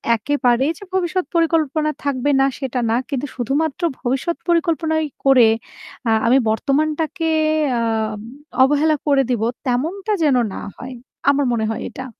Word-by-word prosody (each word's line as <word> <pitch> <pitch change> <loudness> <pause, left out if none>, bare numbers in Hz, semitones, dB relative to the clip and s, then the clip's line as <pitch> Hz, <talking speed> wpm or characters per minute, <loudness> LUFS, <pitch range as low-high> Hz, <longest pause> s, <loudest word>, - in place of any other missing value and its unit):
একেবারেই 260 +3 +1
যে - - -11
ভবিষ্যৎ 370 0 0
পরিকল্পনা 315 -2 +1
থাকবে 280 -1 0
না - - +5
সেটা 265 -2 -3
না। 225 - +2
কিন্তু 275 -1 -2
শুধুমাত্র 280 - -1 0.2
ভবিষ্যৎ 265 +7 -1
পরিকল্পনাই 325 -2 +1 0.2
করে 260 -4 +6 0.6
আ - - +3 0.2
আমি 255 +3 +5
বর্তমানটাকে 310 +7 0 0.5
আম 220 -2 -1 0.4
অবহেলা 295 +3 +3
করে 275 -2 +4
দিব। 240 -4 0 0.3
তেমনটা 350 - -1
যেন 285 -4 +3 0.2
না - - -6
হয়। 255 0 -8 0.3
আমার 285 0 +2
মনে 220 -2 0
হয় 225 - -3
এটা। 260 - -8
280 Hz, 140 wpm, -20 LUFS, 250-315 Hz, 0.6 s, করে